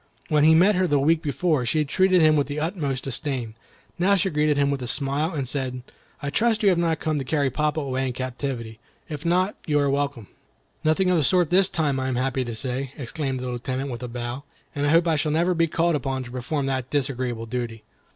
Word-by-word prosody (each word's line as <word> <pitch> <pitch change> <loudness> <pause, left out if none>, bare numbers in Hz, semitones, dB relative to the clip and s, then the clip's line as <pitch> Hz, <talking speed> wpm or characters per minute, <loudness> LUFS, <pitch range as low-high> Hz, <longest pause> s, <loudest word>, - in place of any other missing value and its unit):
When 150 -2 +3
he 160 +1 +7
met 190 +6 +5
her 185 -1 +2
the 145 - +2
week 155 +4 +3
before, 155 -2 0
she 150 +6 +1
treated 185 +3 +3
him 155 0 +5
with 145 -2 +1
the 145 +1 -3
utmost 150 -6 -2
disdain; 130 -3 -3 0.5
now 195 +3 +4
she 190 0 +1
greeted 150 -1 +2
him 140 0 +2
with 140 -2 -2
a 125 - -4
smile, 140 +5 -1
and 135 -3 -2
said, 130 -2 -3 0.4
"I 140 - -2
trust 225 +4 +1
you 200 - +6
have 180 -3 +2
not 165 -1 +1
come 155 -2 -1
to - - -2
carry 140 -1 0
papa 150 +3 0
away 130 -1 -1
in 125 - -3
captivity. 125 -3 -5 0.3
If 150 +1 -5
not, 185 +4 +2
you 150 -2 +2
are 140 -1 +2
welcome." 140 -5 -1 0.6
"Nothing 180 +4 +2
of 180 - +3
the 155 - +2
sort 175 +3 +2
this 190 +1 +5
time, 145 -5 0
I 130 - -2
am 130 - -1
happy 130 +1 0
to 120 -2 -5
say," 130 +2 -3
exclaimed 135 0 -3
the 125 - -4
Lieutenant, 130 +2 -3
with 120 0 -6
a 125 - -4
bow, 120 +2 -5 0.3
"and 145 0 -1
I - - +2
hope 165 +2 +4
I 160 -2 +2
shall 150 +1 0
never 170 +3 +2
be 165 -1 +2
called 170 +2 +1
upon 135 -2 -2
to 120 - -10
perform 130 +3 -2
that 130 -2 -2
disagreeable 130 -5 -2
duty." 115 -1 -4
145 Hz, 235 wpm, -24 LUFS, 130-160 Hz, 0.6 s, he